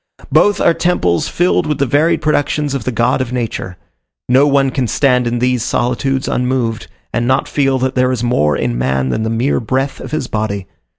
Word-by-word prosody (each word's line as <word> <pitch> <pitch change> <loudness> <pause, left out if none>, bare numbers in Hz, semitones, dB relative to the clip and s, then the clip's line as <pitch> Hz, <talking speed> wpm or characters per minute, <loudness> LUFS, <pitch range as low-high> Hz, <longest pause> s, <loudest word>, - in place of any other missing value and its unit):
Both 205 0 +3
are 170 - +4
temples 90 - 0
filled 175 -1 +1
with 150 -2 -1
the 140 - +1
varied 145 +6 +1
productions 150 -1 0
of 135 -5 -3
the 130 - -1
God 120 +3 +1
of 125 -2 -3
Nature: 115 -7 -4 0.5
no 130 +3 +4
one 135 -1 +2
can 130 -2 -1
stand 125 -1 +2
in 120 +1 -1
these 125 0 +1
solitudes 130 +3 -1
unmoved, 125 -2 -1 0.3
and 120 0 0
not 130 +1 +1
feel 135 -2 +1
that 130 +1 -1
there 130 0 +2
is 125 -2 -2
more 75 - +1
in - - -2
man 65 +1 0
than 65 - -1
the 110 - -1
mere 115 +5 0
breath 130 +4 -2
of - - -8
his 155 -3 -2
body. 105 -4 -3
125 Hz, 200 wpm, -16 LUFS, 115-140 Hz, 0.5 s, are